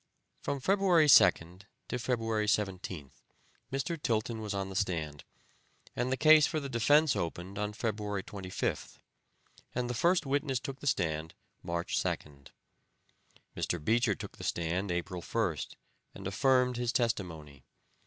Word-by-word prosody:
From 140 - -2
February 185 0 +4
2nd 90 - +5 0.3
to 125 - -2
February 115 -3 -1
17th, 95 -8 -2 0.5
Mr. 145 +4 -2
Tilton 115 -1 -1
was 105 -1 -4
on 100 -1 -2
the 95 - -8
stand, 80 -7 -2 0.7
and 125 +1 -1
the 130 - +1
case 155 0 +7
for 155 - -1
the 140 - -5
defense 145 +4 +4
opened 90 +4 -4
on 105 0 -1
February 105 -3 -3
25th, 95 -2 -4 0.8
and 125 0 -1
the 120 - -2
first 170 +8 +2
witness 135 -1 0
took 135 +2 -7
the 145 - -6
stand 80 - -1 0.3
March 85 -1 -3
2nd. 70 -3 -4 1.1
Mr. 80 -4 -2
Beecher 115 -2 +3
took - - -9
the - - -7
stand 85 +4 -1
April 90 +1 -3
1st, - - -2 0.4
and 95 - -9
affirmed 125 +4 +2
his 120 -1 0
testimony. 80 - -2
105 Hz, 140 wpm, -31 LUFS, 90-130 Hz, 1.1 s, case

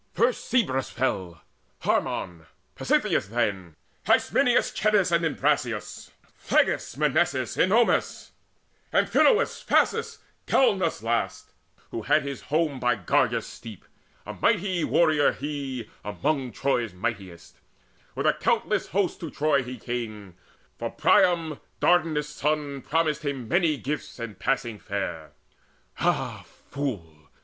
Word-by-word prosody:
First 235 +6 +1
Cebrus 155 - +1
fell, 95 -10 -3 0.4
Harmon, 80 -3 -1 0.3
Pasitheus - - +1
then, 100 -7 -2 0.3
Hysminus, - - +3
Schedius, 205 -4 +2
and 170 0 +2
Imbrasius, 140 -7 -1 0.3
Phleges, - - 0
Mnesaeus, 150 -4 +1
Ennomus, 225 +6 +2 0.6
Amphinous, 470 -1 +3
Phasis, - - +1 0.3
Galenus 195 - +2
last, 115 0 -2 0.4
who - - -4
had - - +2
his 140 -1 -5
home 150 -3 0
By 125 -2 +2
Gargarus' 100 -6 +1
steep 110 -5 -11 0.4
a - - -6
mighty 190 -5 +1
warrior 155 -4 +3
he 135 -5 -5 0.2
Among 135 +5 -1
Troy's 120 -4 -1
mighties: 90 -2 -5 0.6
with - - -2
a - - +5
countless - - 0
host 185 0 -1
To 165 - -5
Troy 145 -1 +1
he 125 0 -7
came: 110 -5 -5 0.5
for - - -2
Priam 165 -4 +2 0.2
Dardanus' 160 -4 +2
son 150 -2 -2
Promised 155 0 0
him 135 -5 -3
many 170 -2 +2
gifts 145 +3 -5
and 115 -5 -7
passing 120 -5 -1
fair. 95 -6 -5 0.7
Ah - - -1 0.3
fool! 85 - -5
140 Hz, 115 wpm, -26 LUFS, 115-160 Hz, 0.7 s, a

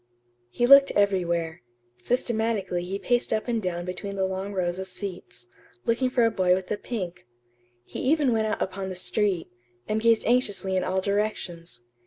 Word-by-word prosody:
He 240 - 0
looked 275 +2 +8
everywhere. 170 -4 +1 0.4
Systematically 220 - -1
he 190 +2 -3
paced 245 +4 0
up 220 +1 -1
and 230 -2 0
down 175 -2 -3
between 190 +2 -5
the 190 -1 0
long 190 +1 -3
rows 180 -2 -1
of 190 - -4
seats, 185 - -5 0.4
looking 245 +3 +1
for 245 -2 +3
a 225 - +2
boy 185 -3 +3
with 185 0 -5
a 210 - 0
pink. 185 - -6 0.6
He - - -7
even 280 -2 +2
went 220 -1 +1
out 215 - -2
upon 190 0 -5
the 185 - -5
street, 190 -1 -1 0.4
and 215 +1 0
gazed 230 -1 +3
anxiously 205 -5 +1
in 185 - +1
all 190 +1 0
directions. 185 - -3
195 Hz, 175 wpm, -26 LUFS, 180-225 Hz, 0.6 s, looked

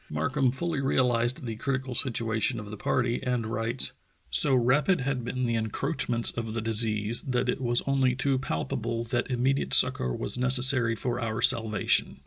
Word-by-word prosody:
Markham 130 - -1
fully 165 +3 -4
realized 125 -2 0
the 115 -2 -6
critical 130 0 -4
situation 115 -1 -2
of 105 -1 -10
the - - -7
party 120 +3 -2
and 125 -3 -3
writes: 115 +3 0 0.4
"So 140 -3 +6
rapid 135 +8 +1
had 135 -2 -3
been 125 +1 -4
the 115 - -2
encroach 115 +8 -2
ments 115 -1 +1
of 115 -1 -6
the - - -1
disease 110 0 +1
that 125 -1 -2
it 125 - -2
was 120 -1 0
only 135 -2 0
too 135 0 -1
palpable 115 +3 -4
that 120 +2 -3
immediate 130 +2 0
succor 65 - +5
was - - -3
necessary 125 -2 +5
for 120 +2 -4
our 110 -1 -4
salvation. 115 -4 +1
120 Hz, 170 wpm, -26 LUFS, 115-130 Hz, 0.4 s, So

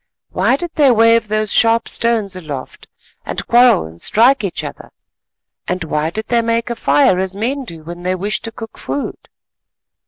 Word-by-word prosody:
Why - - +2
did 345 +3 -5
they 290 -4 +4
wave 230 -1 +4
those 215 0 +1
sharp 230 0 +4
stones 225 -5 +1
aloft, 150 -7 -8 0.4
and - - -4
quarrel 240 - +4
and 80 +1 -12
strike 245 +3 +3
each 190 -4 -3
other? - - -9 0.8
And 180 -1 -2
why 155 0 -1
did 215 +6 -5
they 235 -1 +2
make 230 +1 -1
a - - -2
fire 145 +3 +2
as 190 0 -2
men 260 +6 -2
do 165 -7 -10
when 175 +2 -9
they 185 +1 -1
wish 205 +3 -2
to 225 - -5
cook 225 0 -10
food? 285 - -5
215 Hz, 180 wpm, -17 LUFS, 180-235 Hz, 0.8 s, they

